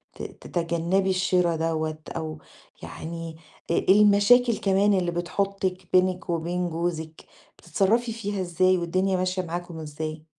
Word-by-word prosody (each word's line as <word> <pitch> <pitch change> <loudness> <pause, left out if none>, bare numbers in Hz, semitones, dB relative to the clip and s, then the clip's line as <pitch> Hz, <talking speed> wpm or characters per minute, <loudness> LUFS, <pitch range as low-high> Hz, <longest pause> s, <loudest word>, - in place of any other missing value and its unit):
ت - - -8
تتجنبي 170 +3 -1
الشرا 180 -2 +2
دوّة 160 -1 -1 0.2
أو 155 -1 -5 0.5
يعني 165 0 -7 0.3
آآ - - +1
المشاكل 210 +4 +5
كمان 200 +1 +2
اللي 180 -2 +1
بتحُطِك 185 +1 -2
بينك 185 -1 +2
وبين 175 +1 -1
جوزِك 160 -1 -4 0.3
بتتصرفي 230 +4 +1
فيها 205 -3 -3
إزاي 185 +1 +2
والدنيا 185 +2 0
ماشية 185 +1 -1
معاكم 175 -1 -6
إزاي؟ 155 0 -6
180 Hz, 120 wpm, -25 LUFS, 165-195 Hz, 0.5 s, المشاكل